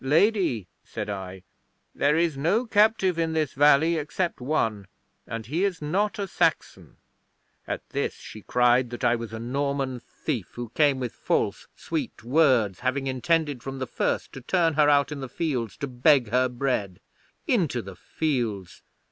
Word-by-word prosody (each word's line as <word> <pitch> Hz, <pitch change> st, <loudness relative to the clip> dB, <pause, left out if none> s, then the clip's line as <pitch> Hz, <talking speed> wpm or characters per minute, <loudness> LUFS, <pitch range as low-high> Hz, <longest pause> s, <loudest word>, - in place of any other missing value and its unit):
'"Lady," 155 Hz, -, +2 dB, 0.2 s
said -, -, -5 dB
I, 95 Hz, -1 st, -7 dB, 0.5 s
"there 150 Hz, +2 st, +2 dB
is 165 Hz, -3 st, +1 dB
no 175 Hz, -, +1 dB
captive 205 Hz, -5 st, +3 dB
in 165 Hz, -1 st, 0 dB
this 155 Hz, -3 st, 0 dB
valley 150 Hz, +4 st, +4 dB
except 160 Hz, +1 st, -2 dB
one, 115 Hz, -8 st, -1 dB, 0.4 s
and 115 Hz, -1 st, -5 dB
he 160 Hz, -, -1 dB
is 195 Hz, -4 st, 0 dB
not 200 Hz, +9 st, -1 dB
a 200 Hz, -1 st, -3 dB
Saxon." 165 Hz, -3 st, -1 dB, 0.7 s
'At -, -, -4 dB
this -, -, -2 dB
she 110 Hz, -, -11 dB
cried 125 Hz, +2 st, +3 dB
that 120 Hz, 0 st, -7 dB
I 120 Hz, -, +4 dB
was 115 Hz, -1 st, -6 dB
a 110 Hz, -, -5 dB
Norman 135 Hz, +2 st, -2 dB
thief, 120 Hz, -, -5 dB
who 120 Hz, -1 st, -5 dB
came 140 Hz, +2 st, +2 dB
with 125 Hz, -3 st, -4 dB
false, -, -, -1 dB
sweet -, -, -4 dB
words, 125 Hz, -, +3 dB
having 130 Hz, +2 st, -1 dB
intended 145 Hz, +1 st, 0 dB
from 135 Hz, +1 st, -6 dB
the 130 Hz, -, -3 dB
first -, -, -2 dB
to 135 Hz, -, -8 dB
turn 165 Hz, +4 st, +1 dB
her 150 Hz, 0 st, +4 dB
out 145 Hz, 0 st, +3 dB
in 150 Hz, -, -5 dB
the 135 Hz, -2 st, -6 dB
fields 130 Hz, -, -2 dB
to 140 Hz, -, -3 dB
beg 130 Hz, -1 st, +3 dB
her 125 Hz, +2 st, +2 dB
bread. 120 Hz, -7 st, -2 dB, 0.5 s
Into -, -, +1 dB
the -, -, -9 dB
fields! 115 Hz, -, -3 dB
135 Hz, 165 wpm, -26 LUFS, 120-160 Hz, 0.7 s, valley